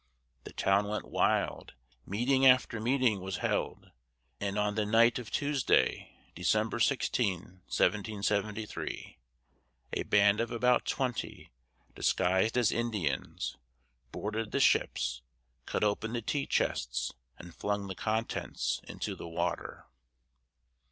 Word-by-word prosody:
The - - -9
town 100 +1 +2
went 105 +1 -4
wild, - - 0 0.3
meeting 125 +7 +1
after 130 -3 +5
meeting 120 -3 +2
was 95 0 -4
held, - - -2 0.5
and 100 0 -2
on 105 0 +1
the 110 0 0
night 115 +3 +4
of 120 - -8
Tuesday, 145 -3 +1 0.2
December 110 +6 0
16, 95 - 0
1773, 105 0 -1 0.7
a - - 0
band 100 +1 +4
of 115 - -2
about 125 +1 +2
twenty, 125 -4 -3 0.4
disguised 95 +5 +1
as 120 -4 +3
Indians, 105 - -2 0.5
boarded 110 +1 -3
the - - 0
ships, - - +2 0.5
cut - - -1
open 105 +2 0
the 120 -2 -2
tea 140 +4 -1
chests - - -1 0.2
and 90 -1 -11
flung 100 -1 -2
the 95 - -5
contents 110 +4 -2
into - - -4
the - - -8
water. 80 - -3
105 Hz, 120 wpm, -31 LUFS, 100-120 Hz, 0.7 s, after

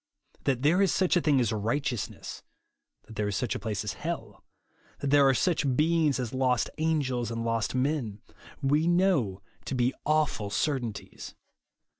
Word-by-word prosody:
That 130 -2 +1
there 170 +6 +4
is 195 - +3
such 185 -1 +2
a 175 - +3
thing 145 -4 +3
as 115 -3 +1
righteousness; 115 +2 -3 0.6
that 110 - -12
there 105 -1 0
is 100 - -2
such 120 0 -1
a - - -4
place 105 -3 -3
as 105 - -3
hell; 130 -11 -6 0.5
that 140 - -2
there 145 -1 +6
are 135 - +4
such 150 -4 +1
beings 155 -1 +2
as 125 -2 -3
lost 130 -2 +1
angels 135 -7 0
and 115 0 -3
lost 115 0 -1
men, 130 -6 -1 0.4
we 150 +4 +2
know 175 - +2 0.2
to 135 - -3
be 125 +1 +2
awful 150 -9 +1
certainties. 120 -2 -3
130 Hz, 165 wpm, -28 LUFS, 115-155 Hz, 0.6 s, there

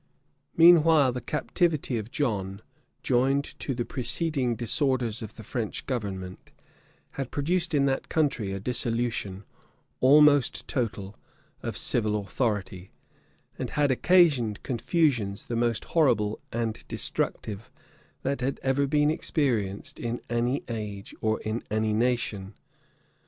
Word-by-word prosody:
} - - -39
Meanwhile, 165 -4 +7
the 125 0 -5
captivity 150 -1 0
of 110 +1 -7
John, 105 -8 -2 0.4
joined 135 +3 +2 0.2
to 135 - -3
the 120 -1 -2
preceding 130 0 -1
disorders 120 -1 0
of 110 - -8
the 110 - -10
French 110 0 -4
government, 95 -7 -5 0.6
had 135 -3 -5
produced 170 +3 0
in 140 -1 +3
that 135 -1 -1
country 135 -10 0
a 95 - -3
dissolution, 115 -3 -1 0.6
almost 145 +1 +5
total, 105 -6 -3 0.5
of - - -4
civil 105 -3 +2
authority, 100 -3 -3 0.7
and - - -3
had 145 -2 +1
occasioned 135 - +3
confusions 120 - 0
the 120 - -4
most 115 -1 0
horrible 115 -10 +2
and 115 -1 -3
destructive 110 +3 -3 0.5
that 140 -1 -1
had 135 +2 -1
ever 135 +1 +1
been 150 +1 +3
experienced 115 - -1
in 120 +1 -3
any 120 +3 0
age 105 -4 -6
or 110 0 +1
in 110 +2 -3
any 110 0 0
nation. 110 -4 -1
120 Hz, 125 wpm, -27 LUFS, 110-140 Hz, 0.7 s, Meanwhile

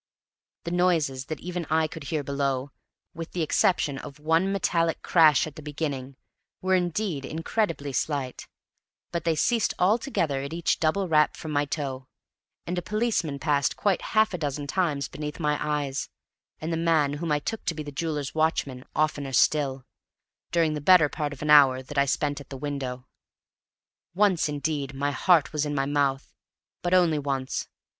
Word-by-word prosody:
The 170 - -4
noises 165 -7 +1
that 155 - -5
even 175 -1 -4
I 160 +1 +3
could 155 -1 -7
hear 150 +1 -2
below, 140 -1 -1 0.4
with 165 0 -7
the 175 - 0
exception 150 -3 +1
of 140 - -9
one 165 +5 +2
metallic 170 -4 0
crash 155 -5 +5
at 155 - -9
the - - -9
beginning, 140 -3 -4 0.4
were 190 0 0
indeed 175 -3 0
incredibly 160 -1 -2
slight; 135 -1 -2 0.6
but 170 -2 -3
they 165 -1 +2
ceased 230 +8 +1
altogether 180 - +1
at 140 +3 -6
each 170 0 0
double 175 +5 +1
rap 150 -2 +3
from 155 - -6
my 145 0 +1
toe; 135 -3 -4 0.6
and 175 +1 -2
a - - -5
policeman 210 -9 -1
passed 140 -1 +1
quite 200 -3 +1 0.2
half 215 -2 +4
a 180 - -3
dozen 145 -1 -3
times 150 -3 0
beneath 150 +1 -6
my 150 -2 +1
eyes, 145 -2 -2 0.5
and 160 +2 -3
the - - 0
man 160 -4 +2
whom 170 -2 -2
I 150 - +3
took 215 +9 -4
to 170 - -1
be 155 - -5
the 145 - -7
jeweller's 150 -1 -3
watchman 145 -5 0
oftener 145 -3 0
still, 135 -2 +2 0.7
during 165 -2 +2
the 150 - -4
better 160 -1 +6
part 150 -1 -3
of 145 0 -8
an 150 - +1
hour 135 -3 +7
that 140 +2 -3
I 140 - +4
spent 145 +1 -1
at 140 - -14
the 135 - -7
window. 130 -3 -4 1.1
Once, 190 -5 +3
indeed, 145 -2 -2
my 140 +1 0
heart 160 +3 +3
was 150 -1 0
in 145 -1 -2
my 135 -1 +1
mouth, 140 -1 0 0.5
but 175 +1 +2
only 170 -4 +4
once. 135 -2 -2
150 Hz, 175 wpm, -26 LUFS, 140-170 Hz, 1.1 s, hour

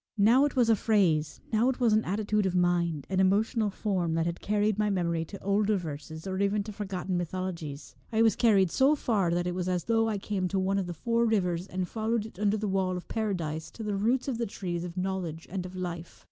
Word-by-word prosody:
Now 235 +7 +5
it 290 - -2
was 245 -3 +4
a 225 - +5
phrase, 185 -8 +1
now 225 +4 +4
it 265 - -2
was 235 -4 +3
an 215 +1 +3
attitude 210 +1 0
of 185 - -2
mind, 175 -4 +1
an 190 0 -1
emotional 210 +3 +2
form, 185 -5 -1
that 165 0 +1
had 170 0 -3
carried 210 0 +1
my 210 0 +2
memory 170 -4 0
to 200 +5 -10
older 205 +1 +2
verses, 160 -1 -7
or 190 0 -3
even 200 +1 +1
to 215 - -7
forgotten 190 -3 -3
mythologies. 170 -6 -5 0.2
I 225 0 +3
was 225 -3 +4
carried 200 -7 +4
so 275 +3 +4
far 210 - +1
that 175 +1 0
it 180 - -1
was 180 0 -2
as 180 -2 0
though 225 -1 +2
I 210 - -1
came 195 -2 -2
to 195 - -2
one 195 +1 +1
of 185 - -3
the 175 - -5
four 235 +7 +1
rivers, 180 -5 0
and 185 -1 -3
followed 220 +1 -1
it 220 -4 -12
under 210 0 +2
the 215 0 -2
wall 190 -1 0
of 180 - -9
Paradise 170 -8 -2
to 225 - -9
the 210 -1 -1
roots 235 +7 +1
of 245 -4 -2
the 235 - -1
trees 175 -3 -4
of 175 0 -7
knowledge 180 -4 -3
and 185 -1 -3
of 185 - -11
life. 175 -2 -6
195 Hz, 240 wpm, -29 LUFS, 175-215 Hz, 0.2 s, Now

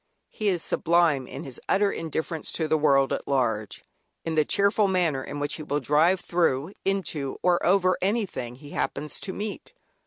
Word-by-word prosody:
He 215 - -3
is 180 -4 +1
sublime 165 -6 +2
in - - -7
his 130 -3 -9
utter 200 +1 +3
indifference 160 0 -3
to 160 - -1
the 155 - +2
world 140 -3 +3
at - - -4
large, 115 -6 -1 0.4
in 165 - -1
the 155 -1 +3
cheerful 200 +5 +2
manner 170 -8 +1
in 145 +2 -6
which 145 0 -1
he - - -7
will 145 -1 -1
drive, 155 +7 +3
through, 170 -2 0
into, 165 -8 -1
or 180 -1 +3
over 185 0 +3
anything 190 - -1
he 145 +3 -13
happens 150 - -3
to 195 - -4
meet. 210 - -6
160 Hz, 180 wpm, -26 LUFS, 145-185 Hz, 0.4 s, utter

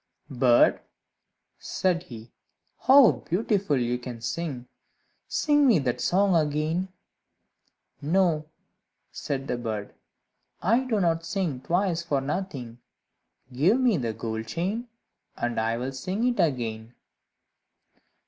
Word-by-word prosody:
"Bird," 125 -2 +4 0.8
said 180 -2 0
he, 115 -7 -11 0.6
"how 270 -2 +8
beautiful 195 - -1
you 120 0 -1
can 120 -1 -7
sing! 125 +1 -4 0.6
Sing 295 -2 +3
me 230 -7 +5
that 125 -4 -1
song 195 +3 +2
again." 155 +3 0 1.1
"No," 160 -1 +1 0.6
said 135 -2 -4
the 125 - -1
bird, 110 -3 -4 0.7
"I 230 +8 +2
do 225 -5 0
not 165 -3 +1
sing 165 -6 -2
twice 175 +1 0
for 150 -5 -1
nothing. 135 -6 -5 0.7
Give 175 - +3
me 250 -5 +3
that 115 -5 -3
gold 110 -1 -4
chain, 195 - -3 0.5
and 120 -1 -1
I 115 +1 0
will 125 +2 -3
sing 185 - -3
it 240 -4 -1
again." 120 -7 -2
155 Hz, 115 wpm, -26 LUFS, 125-190 Hz, 1.1 s, how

